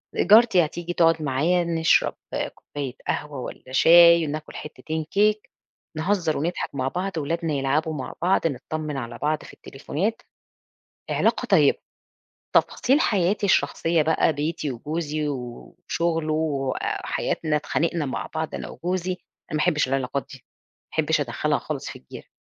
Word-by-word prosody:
جارتي 210 -3 +6
هتيجي 175 +3 -5
تقعد 165 -2 +3
معايا 155 +6 +1
نشرب 165 -1 +2 0.2
آآ - - -1
كوباية 140 -4 -7
قهوة 145 -2 -3
والّا 130 +1 -8
شاي 170 +4 +7
وناكل 155 +1 -6
حتتين 155 +1 -5
كِيك 210 +1 +2 0.5
نهزر 170 -1 0
ونضحك 165 0 -3
مع 130 -1 -1
بعض 185 +7 -2
ولادنا 160 +1 -1
يلعبوا 145 +4 0
مع 135 -4 -5
بعض 180 -1 +3
نطمّن 150 +1 -4
على 120 -3 -5
بعض 150 +1 -1
في - - -12
التليفونات، 165 +10 -4 0.9
علاقة - - +1
طيّبة، - - +4 0.8
تفاصيل 270 +5 +3
حياتي 200 - +1
الشخصية 165 -3 +2
بقى 160 +1 +2
بيتي 150 0 -2
وجوزي 150 +4 -3
و 125 -4 -6
وشغله 165 -2 0
وحياتنا 150 +1 -1
اتْخانقْنا 160 +1 -1
مع 130 - -4
بعض 160 0 -3
أنا - - -5
وجوزي، 180 +1 -3
أنا 180 - -14
ما - - 0
أحبش 155 -5 +2
العلاقات 135 +1 -1
دي 135 - -10
ما - - -41
أحبش - - +2
أدخلها - - 0
خالص - - -5
في - - -9
الجيْرة. 65 - -12
155 Hz, 140 wpm, -24 LUFS, 145-170 Hz, 0.9 s, شاي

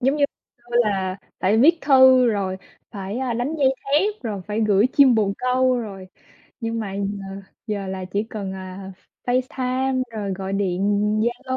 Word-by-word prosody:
Giống 270 +3 +2
như 285 - +3 0.3
xưa 240 0 -5
là 190 -2 -1 0.2
phải 200 +4 +3
viết 325 +7 +5
thư 260 -2 +6
rồi 195 -4 0 0.3
phải, 200 +1 -5
a, 260 -2 -1
đánh 245 +7 -2
dây 265 -1 +3
thép, 380 +9 +1
rồi 205 -5 -4
phải 210 +1 -2
gửi 210 0 +4
chim 270 -4 +6
bồ 205 -3 +2
câu 255 0 +2
rồi, 195 -5 -7 0.5
nhưng 230 0 -2
mà 195 -2 -5
giờ 200 -1 -4 0.2
giờ 205 -3 -3
là 190 -1 -4
chỉ 200 +3 -2
cần, 200 -3 -5
à, 190 0 -8 0.3
F 250 +1 +3
Facetime 255 0 -1
rồi 205 -3 -3
gọi 190 0 -5
điện 190 -2 -1 0.4
Zalo. 245 +3 -2
220 Hz, 175 wpm, -22 LUFS, 195-255 Hz, 0.5 s, thư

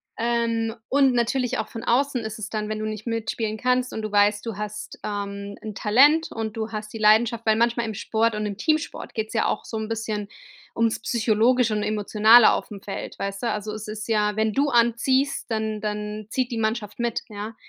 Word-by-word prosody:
Ähm, 230 -1 0
und 270 -2 +4
natürlich 245 +1 0
auch - - -2
von 225 - -7
außen 255 0 +1
ist 220 0 -5
es 215 0 -6
dann, 215 -1 -3
wenn 215 - -2
du 215 - -3
nicht 215 +1 -5
mitspielen 225 -1 -2
kannst 250 +2 +1
und 220 - -4
du 215 - -4
weißt, 205 +1 +3
du 225 -4 -4
hast, 210 0 -6
ähm, 200 -1 -4
'n 215 -1 -6
Talent, 280 +11 +4
und 220 -1 -4
du 220 0 -4
hast 215 0 -6
die 225 - -6
Leidenschaft 220 +2 +3
weil 215 - +5
manchmal 235 0 +1
im 220 - -5
Sport 225 +2 0
und 210 - -2
im 205 -2 -4
Teamsport 310 +7 -1
geht 220 -1 -2
es - - -9
ja 225 - +2
auch - - -2
so - - -7
'n 220 0 -4
bisschen 215 -2 -3 0.5
ums 230 -1 +1
Psychologische 230 +1 +2
und 210 - 0
Emotionale 215 +2 +5
auf - - -2
dem 200 -2 -9
Feld, 200 - -6
weißt 195 0 -4
du? 235 - +1
Also, 210 0 -4
es 215 0 -7
ist 215 +1 -6
ja 210 -2 +1
wenn 220 0 +1
du 285 +4 +2
anziehst, 255 +3 +2
dann 220 -1 -2
dann 210 0 -4
zieht 255 0 -1
die 230 - -2
Mannschaft 220 0 -2
mit, 235 -1 -1
ja? 210 +1 -6
220 Hz, 215 wpm, -24 LUFS, 210-235 Hz, 0.5 s, weil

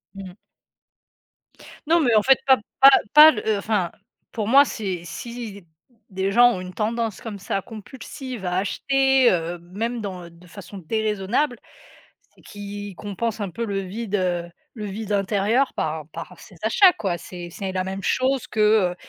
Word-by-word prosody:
Mmh. 190 -2 -9 1.5
Non 335 +2 +4
mais, 250 -7 +2
en 215 - +5
fait, 265 +4 +5
pas 265 -1 +6 0.2
pas 270 - +10 0.2
pas 305 +1 +10
le 220 - -5
heu, 215 -1 +2
enfin 200 -3 -1 0.4
pour 215 -3 -3
moi, 275 +5 +7
c'est 190 -8 -4
si 220 0 -8 0.4
des 190 +1 -2
gens 245 +3 +6
ont 185 - -5
une 185 0 -8
tendance, 225 0 -2
comme 215 -3 -7
ça, 195 0 -3
compulsive 240 +1 -9
à 180 0 -1
acheter, 265 +6 +2
heu, 170 0 -2
même 215 +8 -4
dans 185 -4 -7
de 170 +1 -19
façon 200 +2 -11
déraisonnable, 215 - -1 0.8
c'est - - -22
qu'ils 205 -1 -8
compensent 210 +3 -4
un 195 - -4
peu 230 +6 -4
le 200 -2 -2
vide, 205 +2 -4
heu, 175 -3 -1 0.3
le 215 -2 -6
vide 210 +1 -6
intérieur 205 +6 +1
par 155 -1 -3
par - - -9
ces - - -15
achats, 380 -3 +5
quoi. 185 -5 -3
C'est 175 0 -9
c'est 190 +2 -5
la 185 0 -2
même 190 +1 -5
chose 260 +4 0
que, 210 -4 +2
heu, - - -19
205 Hz, 170 wpm, -23 LUFS, 185-235 Hz, 1.5 s, pas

